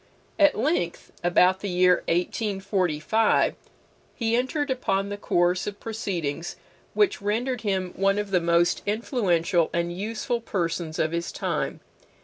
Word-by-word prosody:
At 295 -1 +5
length, 260 - -1
about 180 +2 +4
the 200 - -4
year 180 0 +4
1845, 190 +1 +1 0.6
he 230 -1 0
entered 265 +3 0
upon 195 -6 0
the 205 - -3
course 180 -1 +1
of 205 0 -5
proceedings 175 -8 -3 0.4
which 415 - +2
rendered 230 +4 -1
him 190 -4 -1
one 195 +1 +2
of 205 -1 -3
the 180 -2 +3
most 170 +1 +2
influential 190 - +1
and 170 0 -1
useful 225 +4 -2
persons 170 -6 -2
of 155 - +1
his 170 +1 -2
time. - - -3
195 Hz, 130 wpm, -25 LUFS, 175-225 Hz, 0.6 s, At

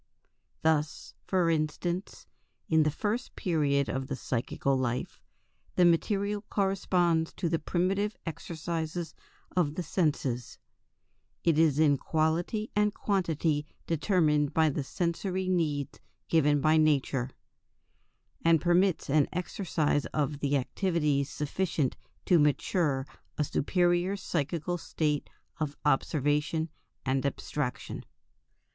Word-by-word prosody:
Thus, 155 -1 0
for 185 -3 +2
instance, 170 +4 -2 0.4
in 160 -1 +4
the 155 - +3
first 215 - -2
period 145 - +1
of 130 0 -3
the 140 - -3
psychical 130 +2 -1
life, 125 -1 -2 0.5
the 180 - +5
material 200 +4 +2
corresponds 180 -4 +1
to 180 - -2
the 165 0 0
primitive 195 +4 0
exercises 165 0 -4 0.4
of 155 -5 +1
the 180 - -2
senses 140 - -1 0.9
it 165 -2 +3
is 155 -4 +4
in 150 -3 +4
quality 170 +7 0
and 210 0 +2
quantity 160 -6 0 0.2
determined 155 -4 +2
by 160 -1 +4
the 145 0 -2
sensory 180 +5 -2
needs 155 -6 0 0.3
given 150 -3 +3
by 155 +1 +4
nature 140 -4 +2 1.1
and 165 -1 +5
permits 175 +2 +2
an 145 0 +3
exercise 170 -4 -1
of 145 -1 -1
the 145 0 +1
activities 150 -1 0
sufficient 150 -2 -1 0.3
to 175 -3 +5
mature 145 -1 +1 0.3
a 150 - +2
superior 175 +5 +1
psychical 170 0 -2
state 150 -3 -1 0.3
of 150 -2 -3
observation 150 +3 +1 0.4
and 130 0 +1
abstraction. 140 -1 -3
160 Hz, 110 wpm, -29 LUFS, 145-175 Hz, 1.1 s, the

